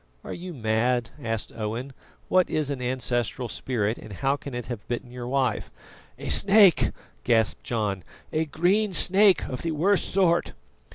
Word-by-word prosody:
"Are - - -7
you 180 +1 -7
mad?" 120 -2 0
asked 115 -3 -3
Owen. 115 +5 -4 0.3
"What 185 -1 +3
is 150 -2 -1
an 135 -2 -4
ancestral 125 -1 -2
spirit, 115 -3 -2
and 110 -1 -10
how 135 +8 0
can 140 -2 -8
it 120 - -5
have 120 -5 -7
bitten 120 0 -5
your 125 -1 -7
wife?" 130 -4 -1 0.5
"A - - -6
snake," 200 -4 +6 0.3
gasped 115 -2 +1
John, 105 -6 -2 0.3
"a 160 +1 +1
green 185 +7 +1
snake 195 +1 +5
of 125 - -5
the 165 -1 -2
worst 190 +6 +1
sort." 175 -3 +2
130 Hz, 160 wpm, -25 LUFS, 115-170 Hz, 0.5 s, snake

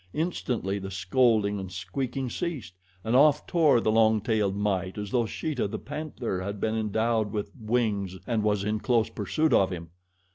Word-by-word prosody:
Instantly 125 - -1
the 95 0 -6
scolding 100 +2 +2
and 95 -1 -6
squeaking 125 +9 -3
ceased, 130 - -4 0.3
and 110 +4 0
off 150 +2 +5
tore 155 -8 +4
the 110 - +1
long 110 0 +4
tailed 105 -2 0
mite 95 -2 -1
as 105 -1 -5
though 120 -3 +1
Sheeta, 140 -1 -2
the - - -4
panther, 145 -10 -4
had 100 +2 -4
been 110 +1 0
endowed 110 0 0
with 105 -1 -3
wings 105 -5 -1
and 115 -3 0
was 105 -1 +1
in 105 +1 -1
close 115 -1 +1
pursuit 155 - 0
of 95 - +4
him. 85 -3 -6
110 Hz, 175 wpm, -27 LUFS, 100-125 Hz, 0.3 s, off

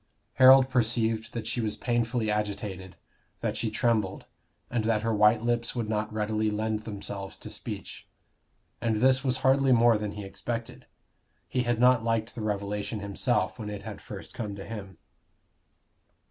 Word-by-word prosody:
Harold 130 0 +9
perceived 115 -2 +1
that 115 - -5
she 120 - -2
was 110 -2 -2
painfully 120 -2 0
agitated, 100 -3 -3 0.5
that - - -1
she 115 - -1
trembled, 110 -3 0 0.4
and 120 -2 -1
that 110 -1 +1
her 115 0 +1
white 105 +1 +4
lips 120 0 0
would 115 -3 -2
not 105 0 -1
readily 110 0 0
lend 110 +1 -1
themselves 100 -2 -6
to - - -9
speech. - - -7 0.7
And 115 -2 +1
this 130 +4 +3
was 130 -2 +1
hardly 135 0 +4
more 115 -2 +5
than 105 -1 -3
he 105 - -6
expected. 115 +4 -6 0.6
He 125 - 0
had 120 -1 +1
not 125 -1 +5
liked 115 0 0
the 120 - -6
revelation 105 0 -2
himself 100 -2 0
when 105 -2 -5
it 100 -1 -6
had - - -7
first - - -9
come 105 -3 -4
to 100 - -8
him. 100 -5 -8
110 Hz, 160 wpm, -28 LUFS, 105-120 Hz, 0.7 s, Harold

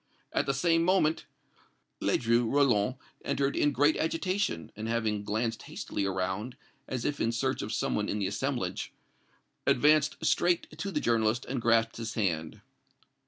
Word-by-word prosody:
At - - +1
the 135 - +2
same 165 +3 +3
moment, 165 -3 +2 0.7
Ledru 115 -1 +2
Rollin 130 -5 +3 0.3
entered 140 0 0
in 145 - +3
great 145 +3 +3
agitation, 165 - -1
and, 110 +1 -5
having 110 -3 0
glanced 110 +2 -2
hastily 100 - -3
around, 95 +6 -3 0.3
as 125 -2 -3
if 145 -1 -1
in 115 - +2
search 130 +3 -1
of 105 - -4
some 110 - -1
one 105 0 -1
in 105 - -1
the 100 - -1
assemblage, 100 -2 -2 0.7
advanced 150 +3 +4
straight 175 -3 +1
to 180 +5 -4
the - - -1
journalist 115 0 +1
and 125 -1 -3
grasped 115 -1 +2
his 115 0 -5
hand. 80 -7 -1
120 Hz, 155 wpm, -29 LUFS, 105-145 Hz, 0.7 s, advanced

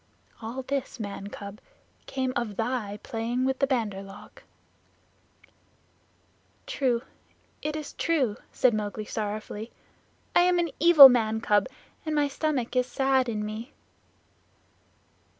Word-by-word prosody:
All 235 +4 -5
this, 270 -1 -3
man 200 -2 -5
cub, 200 +1 -9 0.5
came 260 -1 -2
of 230 -4 -2
thy 225 -2 -2
playing 235 +3 -2
with 265 0 0
the 275 - +2
Bandar 220 -7 -1
log." 195 0 -13 2.2
"True, 260 - 0 0.6
it 300 0 -3
is 305 -2 -6
true," 275 -10 0
said 255 -2 +3
Mowgli 210 0 -3
sorrowfully. 215 +1 -5 0.6
"I - - +7
am 360 0 +3
an 340 -3 0
evil 320 -4 +11
man 220 -3 +1
cub, 210 -1 +2 0.4
and 310 -1 -2
my 295 -1 +3
stomach 280 -4 -2
is 250 0 +2
sad 265 -1 +1
in 210 -2 -2
me." 220 +5 -7
245 Hz, 125 wpm, -27 LUFS, 215-275 Hz, 2.2 s, evil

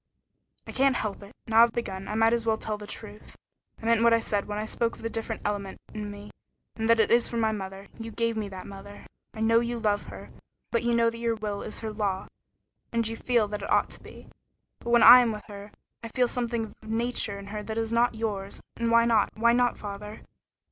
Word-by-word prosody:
"I - - -8
can't 270 0 +3
help 210 -3 -3
it. 200 0 -12
Now 225 0 +5
I've 235 -1 +5
begun, 195 -5 -4
I 210 - -3
might 225 +1 +4
as 235 -1 +1
well 220 -1 +1
tell 215 -1 -3
the 210 0 -9
truth. 210 -1 -10 0.4
I - - -10
meant 230 0 +3
what 230 0 +6
I - - +2
said 205 -3 -2
when 205 0 -4
I 215 - -2
spoke 230 +1 -1
of - - -15
the 230 - -3
different 225 0 -4
element 200 -2 -3 0.2
in 210 -1 -5
me, 205 0 -10 0.4
and 225 0 -2
that 230 0 +5
it 220 - +3
is 235 0 +4
from 235 - -3
my 220 -1 +2
mother. 195 -1 -6
You 225 0 -6
gave 230 +1 -1
me 215 -2 -3
that 190 -1 -8
mother. 200 +1 -11 0.3
I 220 - -6
know 230 +1 +4
you 240 0 -2
love 210 -3 0
her, - - -10 0.4
and 235 - +1
you 235 0 +2
know 230 0 +3
that 230 - -9
your 230 -1 0
will 210 -2 -4
is - - -6
her 220 -1 -4
law, 200 -3 -1 0.7
as 230 -1 0
you - - -4
feel 235 -2 +1
that 210 0 -4
it - - -5
ought - - +3
to - - -9
be. - - -13 0.5
But 235 - -7
when 235 0 +5
I 245 +2 +11
am 240 -2 +2
with 210 -1 -7
her, 205 0 -10 0.3
I - - -4
feel 245 +2 +1
something 235 -2 -2
of - - -13
a 220 - -14
nature 225 -2 -1
in 200 - -9
her 210 - -3
that 220 +1 -5
is 225 0 -1
not 235 0 +3
yours. 205 -3 -3 0.2
And 235 0 0
why 230 0 +5
not? 225 -3 +3
Why 235 +2 +4
not, 245 0 +2
father? 210 +1 -7
225 Hz, 250 wpm, -27 LUFS, 210-230 Hz, 0.7 s, I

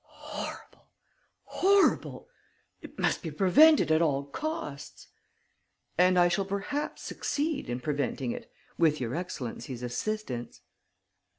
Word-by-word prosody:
"Horrible! - - -9 0.6
Horrible! 395 +1 +2 0.5
It - - -12
must - - +1
be 165 - -4
prevented 200 - +5
at 155 +1 +4
all 140 -4 +1
costs...." 145 - -6 0.9
"And 180 +1 +4
I 175 0 +6
shall 175 +3 0
perhaps 200 +10 -3
succeed 300 - -2
in 120 +1 -2
preventing 140 -4 -2
it, - - -8 0.3
with 155 -3 +3
your 120 -1 -3
excellency's 135 -7 -5
assistance." 125 - -4
170 Hz, 110 wpm, -29 LUFS, 140-215 Hz, 0.9 s, I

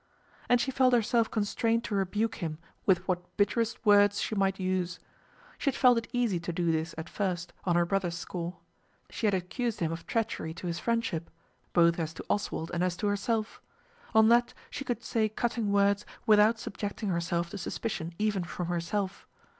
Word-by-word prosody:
And 245 - +5
she 265 - 0
felt 255 -1 +3
herself 230 0 +2
constrained 225 +2 0
to 235 - -4
rebuke 205 +3 0
him 160 -3 -3 0.3
with 185 -1 +3
what 180 -1 -3
bitterest 225 +3 0
words 205 -1 +6
she - - -2
might 195 -1 +1
use. 185 -1 -1 0.6
She - - -5
had - - -3
felt 245 -2 +5
it 230 - -10
easy 240 -7 +1
to 170 +1 -4
do 170 0 +1
this 160 +1 -2
at 160 - -5
first, 175 -4 -3
on 175 -2 +2
her 175 0 +4
brother's 175 -2 -1
score. 175 0 -5 0.5
She 220 - -1
had 200 - +3
accused 220 +6 -2
him 165 -2 0
of 165 0 -6
treachery 225 -8 -2
to - - -8
his 170 -1 -2
friendship, 230 -8 -1 0.4
both 170 0 +4
as 160 -1 -3
to - - -8
Oswald 200 -5 -2
and 175 0 0
as 180 -1 0
to 210 - -3
herself. 215 +2 -1 0.5
On 220 0 +7
that 240 +1 +4 0.2
she 275 - -4
could 245 -3 -3
say 220 -2 +1
cutting 225 -1 -1
words 200 0 +3 0.2
without 215 +1 +5
subjecting 205 0 -4
herself 170 -1 -1
to 205 - -5
suspicion 175 -2 -3
even 210 -3 0
from 175 0 -4
herself. 180 +3 -2
200 Hz, 185 wpm, -29 LUFS, 175-225 Hz, 0.6 s, On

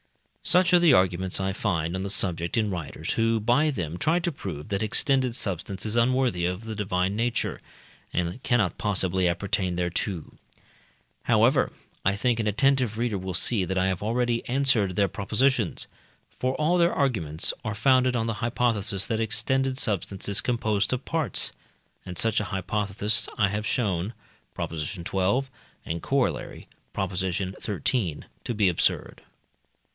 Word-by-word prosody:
Such 180 0 +3
are 175 - +8
the 170 -5 +6
arguments 95 -2 +2
I 95 0 -1
find 85 -5 -1
on 95 - -3
the 100 - -3
subject 85 -1 +1
in 105 -2 +1
writers, 85 -5 -4
who 115 0 +2
by 120 +8 +3
them 90 - -3
try 160 +3 +2
to 175 0 -1
prove 95 - -7
that 100 -1 -1
extended 130 +2 +2
substance 95 0 -2
is 110 +1 -1
unworthy 120 -6 +2
of 90 +5 -4
the 110 - -4
divine 95 -2 -1
nature, 120 +1 -1 0.5
and 90 +7 -2
cannot 115 -11 +1
possibly 95 -3 +1
appertain 90 0 -1
thereto. 90 0 -3 0.9
However, - - +3 0.3
I 100 +1 +2
think 120 +3 +1
an 110 - 0
attentive 125 0 +2
reader 115 -4 -1
will 95 -1 -4
see 100 +2 +2
that 95 +1 -2
I 90 - +2
have 95 -2 -1
already 120 +2 0
answered 125 -8 +2
their 100 0 +3
propositions; 110 +2 0 0.5
for 130 +1 0
all 170 +4 +2
their 170 0 +4
arguments 90 - 0
are 105 - -3
founded 130 +2 +3
on 115 -1 0
the 115 - -1
hypothesis 110 -4 +1
that 110 - -1
extended 130 +4 0
substance 100 -5 -1
is 100 -1 +3
composed 110 -4 0
of 125 +1 -2
parts, 160 -6 -1 0.6
and 90 -1 -6
such 115 +3 +3
a 105 - -2
hypothesis 105 +2 0
I 100 -2 +3
have 105 +2 -2
shown 100 -4 -1 0.4
(Prop. - - -4
xii., 80 +4 -4 0.8
and 85 +1 -3
Coroll. 135 -2 -1 0.3
Prop. 95 -1 -2
xiii.) 95 +1 -1
to 100 - -3
be 105 -2 +3
absurd. 90 - 0
105 Hz, 155 wpm, -26 LUFS, 95-120 Hz, 0.9 s, are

